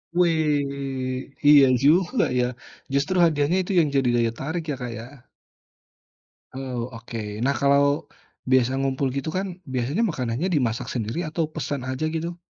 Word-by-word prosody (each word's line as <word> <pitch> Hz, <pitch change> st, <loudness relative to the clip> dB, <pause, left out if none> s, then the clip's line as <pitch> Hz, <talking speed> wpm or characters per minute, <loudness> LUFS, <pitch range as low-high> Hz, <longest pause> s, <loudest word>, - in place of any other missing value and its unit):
Weh 140 Hz, -6 st, 0 dB, 0.2 s
iya 145 Hz, -2 st, +9 dB, 0.2 s
juga 180 Hz, -, +4 dB, 0.2 s
ya, 125 Hz, -, +3 dB, 0.5 s
justru 145 Hz, +7 st, +1 dB
hadiahnya 155 Hz, +1 st, +2 dB
itu 185 Hz, -, -5 dB
yang 160 Hz, -, +3 dB
jadi 135 Hz, -2 st, +3 dB
daya 115 Hz, -1 st, +2 dB
tarik 160 Hz, +5 st, -3 dB
ya -, -, -2 dB
Kak 120 Hz, -, -4 dB
ya. 125 Hz, +3 st, -12 dB, 1.3 s
Oh 125 Hz, -3 st, -4 dB
oke 115 Hz, 0 st, -8 dB, 0.3 s
nah 140 Hz, +2 st, +2 dB
kalau, 140 Hz, 0 st, +4 dB, 0.7 s
biasa 130 Hz, -1 st, +4 dB
ngumpul 135 Hz, 0 st, 0 dB
gitu 140 Hz, -, -3 dB
kan 195 Hz, -, -1 dB, 0.3 s
biasanya 135 Hz, -, 0 dB
makanannya 130 Hz, +2 st, -2 dB
dimasak 120 Hz, -4 st, 0 dB
sendiri 115 Hz, +4 st, -3 dB
atau 160 Hz, +1 st, -1 dB
pesan 140 Hz, -2 st, -3 dB
aja 130 Hz, +4 st, -2 dB
gitu? 170 Hz, +2 st, -4 dB
140 Hz, 145 wpm, -24 LUFS, 130-160 Hz, 1.3 s, iya